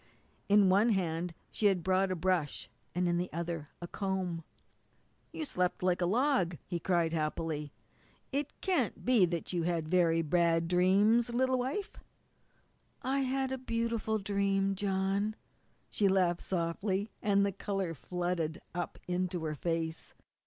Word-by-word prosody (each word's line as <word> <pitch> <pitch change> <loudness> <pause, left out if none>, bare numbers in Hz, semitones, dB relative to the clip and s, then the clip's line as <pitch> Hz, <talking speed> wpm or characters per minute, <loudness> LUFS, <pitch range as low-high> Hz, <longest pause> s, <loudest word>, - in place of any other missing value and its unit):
In 205 -1 +6
one 200 +5 +4
hand 175 -4 -1 0.2
she 210 - +2
had 185 -4 +2
brought 190 +1 +2
a 185 - 0
brush 175 -4 0 0.3
and 180 0 +1
in 175 0 +1
the 180 - -3
other 165 -2 -4
a - - -4
comb. 185 -4 -2 0.9
"You 315 - -4
slept 180 -8 -1
like 180 0 +2
a 175 - +2
log," 220 - +2
he 175 -2 -3
cried 170 -1 +1
happily. 155 -1 -2 0.6
"It 280 +1 -1
can't 355 - 0
be 230 -7 +5
that 170 +1 -3
you 175 - +1
had 165 -2 -1
very 165 -1 +3
bad 165 +1 +2
dreams, 200 +7 +4
little 255 +2 +1
wife?" 285 +12 -2 1.1
"I 270 +2 +1
had 265 0 0
a 265 - -2
beautiful 230 -3 -1
dream, 195 -1 +1
John," 195 +2 0 0.6
she 205 - +2
laughed 180 -3 +2
softly, 190 +4 -1
and 200 -1 +3
the 200 - 0
colour 195 -3 -3
flooded 170 +2 -2
up 175 0 -4
into 180 -1 -1
her 155 -1 -2
face. 165 +1 -3
185 Hz, 145 wpm, -32 LUFS, 170-210 Hz, 1.1 s, In